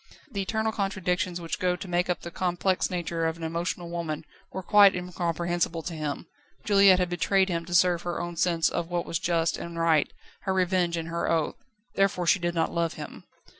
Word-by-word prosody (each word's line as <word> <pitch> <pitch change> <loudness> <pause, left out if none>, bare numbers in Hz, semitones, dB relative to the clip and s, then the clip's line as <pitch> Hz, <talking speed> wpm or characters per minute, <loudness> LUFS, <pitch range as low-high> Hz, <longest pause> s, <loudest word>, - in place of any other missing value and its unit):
The 200 - -2
eternal 220 +3 -1
contradictions 185 -3 -1
which 165 -1 -4
go 180 -1 +1
to 185 - -8
make 175 0 0
up 180 - -1
the 170 - -7
complex 180 +1 0
nature 170 -2 -1
of 160 0 -3
an 170 - -9
emotional 170 +2 -3
woman 165 -3 -4 0.3
were 190 - -5
quite 200 +1 +6
incomprehensible 175 -1 -2
to 175 - -5
him. 150 -3 -4 0.4
Juliette 200 -2 +6
had 180 -1 +1
betrayed 190 +2 +2
him 170 -1 -2
to 175 0 -3
serve 175 -1 +4
her 175 -1 -3
own 175 0 -4
sense 165 -1 +2
of 165 - -2
what 175 -1 -1
was 165 - -2
just 165 -1 +1
and 170 0 -7
right, 165 -3 +2 0.3
her 190 -1 0
revenge 180 -2 +1
and 165 0 -4
her 170 0 -1
oath. 165 -2 +1 0.4
Therefore 195 -2 +1
she 190 - +4
did 175 0 -2
not 165 -1 0
love 170 -1 0
him. - - -9
175 Hz, 205 wpm, -27 LUFS, 170-185 Hz, 0.4 s, quite